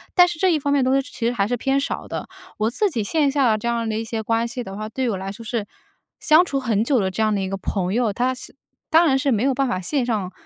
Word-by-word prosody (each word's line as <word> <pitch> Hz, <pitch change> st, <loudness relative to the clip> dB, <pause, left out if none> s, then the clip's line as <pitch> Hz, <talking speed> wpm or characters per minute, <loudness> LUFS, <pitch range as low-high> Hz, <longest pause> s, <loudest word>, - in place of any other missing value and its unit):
但 360 Hz, -1 st, +7 dB
是 345 Hz, -2 st, -4 dB
这 370 Hz, +2 st, +3 dB
一 315 Hz, -, +2 dB
方 285 Hz, 0 st, 0 dB
面 280 Hz, -2 st, +3 dB
的 255 Hz, -, +2 dB
东 270 Hz, +1 st, +3 dB
西 270 Hz, -, -11 dB
其 230 Hz, -, -5 dB
实 235 Hz, -, +2 dB
还 200 Hz, -5 st, 0 dB
是 245 Hz, -, 0 dB
偏 270 Hz, +3 st, +1 dB
少 275 Hz, -, -3 dB
的。 -, -, -5 dB, 0.3 s
我 215 Hz, +1 st, +1 dB
自 405 Hz, -, +1 dB
己 245 Hz, -10 st, -2 dB
线 285 Hz, +7 st, +1 dB
下 270 Hz, -3 st, +3 dB
的 215 Hz, -, +2 dB
这 215 Hz, -, -8 dB
样 235 Hz, -1 st, 0 dB
的 215 Hz, -1 st, -1 dB
一 225 Hz, -, -2 dB
些 225 Hz, 0 st, -3 dB
关 225 Hz, +1 st, 0 dB
系 235 Hz, +2 st, -4 dB
的 195 Hz, -, -7 dB
话， 215 Hz, +1 st, -5 dB
对 255 Hz, +2 st, -2 dB
我 215 Hz, -, -1 dB
来 190 Hz, +1 st, -5 dB
说 225 Hz, +3 st, -10 dB
是 220 Hz, -1 st, -2 dB, 0.5 s
相 315 Hz, +3 st, +6 dB
处 280 Hz, -6 st, -2 dB
很 225 Hz, -5 st, +1 dB
久 255 Hz, +1 st, +2 dB
的 190 Hz, -2 st, 0 dB
这 195 Hz, +4 st, -1 dB
样 215 Hz, -1 st, +2 dB
的 200 Hz, -, 0 dB
一 190 Hz, -, -2 dB
个 195 Hz, -, -3 dB
朋 190 Hz, -1 st, -2 dB
友， 235 Hz, -1 st, +1 dB
他 250 Hz, +5 st, 0 dB
是 255 Hz, -, -9 dB, 0.4 s
当 330 Hz, +2 st, +5 dB
然 270 Hz, -3 st, +3 dB
是 275 Hz, +1 st, +1 dB
没 220 Hz, -1 st, +1 dB
有 270 Hz, 0 st, +2 dB
办 275 Hz, +1 st, +1 dB
法 240 Hz, -7 st, -1 dB
线 260 Hz, +7 st, 0 dB
上 210 Hz, -6 st, -2 dB
235 Hz, 340 characters per minute, -22 LUFS, 215-275 Hz, 0.5 s, 但